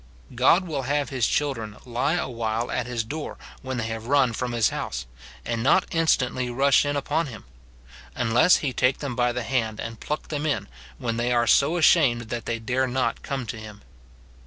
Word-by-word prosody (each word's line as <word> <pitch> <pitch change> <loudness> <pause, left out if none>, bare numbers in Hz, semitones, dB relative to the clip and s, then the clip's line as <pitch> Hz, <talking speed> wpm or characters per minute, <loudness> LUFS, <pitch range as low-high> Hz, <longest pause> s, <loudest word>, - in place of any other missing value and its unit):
God 130 +9 +4
will 150 -5 -3
have 145 +2 -1
his 130 -5 +1
children 115 -8 -2
lie 125 +6 0
a 175 - -1
while 115 -1 -2
at 125 -1 -2
his 120 -2 -2
door 150 +7 -6 0.2
when 130 -1 -4
they 115 - -2
have 115 0 -5
run 135 -3 +3
from 125 +2 -3
his 115 -3 +2
house, - - -4 0.4
and 115 -1 -2
not - - +4
instantly 130 -6 +1
rush 135 +2 +4
in 145 0 -1
upon 155 +3 0
him; 115 -5 -9 0.7
unless 120 +8 +4
he 130 - -1
take 125 +2 +2
them 140 -4 -4
by 120 0 +2
the 125 0 -3
hand 110 -2 -1
and 115 -1 -6
pluck 150 - -4
them 150 0 -2
in, 145 - -1 0.3
when 115 -1 -2
they 120 +1 0
are 120 -1 +3
so 140 +8 +4
ashamed 130 -9 +4
that 120 -2 -4
they 115 - -1
dare 125 +3 0
not 125 -2 -1
come 135 -3 -4
to 115 - -5
him. 105 -1 -11
125 Hz, 200 wpm, -25 LUFS, 115-140 Hz, 0.7 s, God